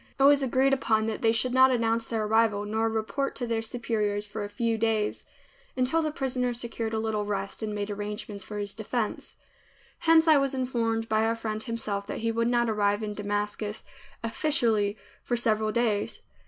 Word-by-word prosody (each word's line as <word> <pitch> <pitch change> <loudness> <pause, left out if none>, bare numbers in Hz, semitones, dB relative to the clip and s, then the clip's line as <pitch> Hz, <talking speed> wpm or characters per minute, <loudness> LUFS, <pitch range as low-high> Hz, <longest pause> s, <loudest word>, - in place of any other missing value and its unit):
It - - +4
was 285 0 +6
agreed 265 +1 +2
upon 220 -5 +2
that 220 -1 -3
they 225 - +4
should 245 +2 0
not 260 0 +7
announce 230 -2 +1
their 225 -2 -1
arrival 215 -1 +2
nor 220 +2 0
report 225 +5 -2
to 245 - -3
their 230 -1 -1
superiors 215 -3 -1
for 205 +1 -5
a 205 - -5
few 230 +2 0
days 220 -1 0 0.5
until 260 +6 +2
the 310 - 0
prisoner 255 -5 -1
secured 230 -2 -3
a - - 0
little 220 -1 -1
rest 200 0 -3
and 215 -1 -3
made 205 0 -3
arrangements 205 0 -5
for 210 - -7
his 205 -1 -2
defense. 220 0 -3 0.6
Hence 330 -1 +5
I 310 -2 +7
was 275 -1 +1
informed 230 -3 -1
by 220 0 +2
our 225 +1 +1
friend 215 -1 -4
himself 220 -4 -3
that - - -4
he 230 0 +1
would 230 +1 0
not 240 -1 +2
arrive 205 -1 +1
in 210 -1 -3
Damascus 210 +1 -3 0.4
"officially" 225 -5 +1 0.2
for 240 - -1
several 215 -2 +1
days. 220 -3 0
225 Hz, 190 wpm, -27 LUFS, 210-245 Hz, 0.6 s, not